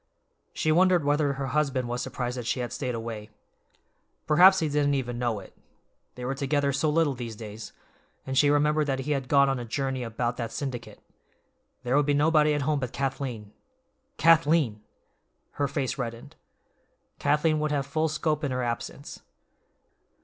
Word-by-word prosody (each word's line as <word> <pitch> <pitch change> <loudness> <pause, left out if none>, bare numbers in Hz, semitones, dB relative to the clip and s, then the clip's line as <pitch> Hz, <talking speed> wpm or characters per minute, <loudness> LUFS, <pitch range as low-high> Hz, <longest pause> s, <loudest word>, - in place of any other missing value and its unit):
She 155 - 0
wondered 180 -1 +4
whether 145 -1 +2
her 135 0 -4
husband 135 -3 0
was 120 +1 -3
surprised 125 -1 -3
that 120 -2 -5
she 125 - 0
had 120 -1 -4
stayed 125 -4 -3
away. 115 -2 -6 1.0
Perhaps 185 +5 +7
he 160 - +1
didn't 145 -1 +1
even 120 -3 -3
know 120 -4 -1
it, 95 - -14 0.6
they 125 - -6
were 135 - -1
together 140 +1 0
so 145 +3 +1
little 155 -2 +2
these 120 -3 -6
days, 110 0 -9 0.5
and 130 - -3
she 145 +2 +5
remembered 150 +1 +2
that 135 -1 -1
he 145 +3 -3
had 135 -3 -1
gone 140 +1 +5
on 135 -2 0
a - - -4
journey 130 +2 -2
about 120 +1 -2
that 115 -2 -4
syndicate. 130 -4 -6 0.8
There 125 +1 0
would 145 0 +3
be 145 - +3
nobody 150 0 +3
at 145 - -1
home 150 0 +1
but 125 -3 -4
Kathleen. 130 -6 -3 0.7
Kathleen! 155 -8 +3 0.7
Her 145 - -1
face 140 -1 -3
reddened. 115 -2 -6 0.8
Kathleen 150 +2 +2
would 150 0 -1
have 140 -2 0
full 155 +3 0
scope 155 0 -1
in 145 - 0
her 125 -1 -2
absence. 120 +4 -5
140 Hz, 170 wpm, -27 LUFS, 125-150 Hz, 1.0 s, Perhaps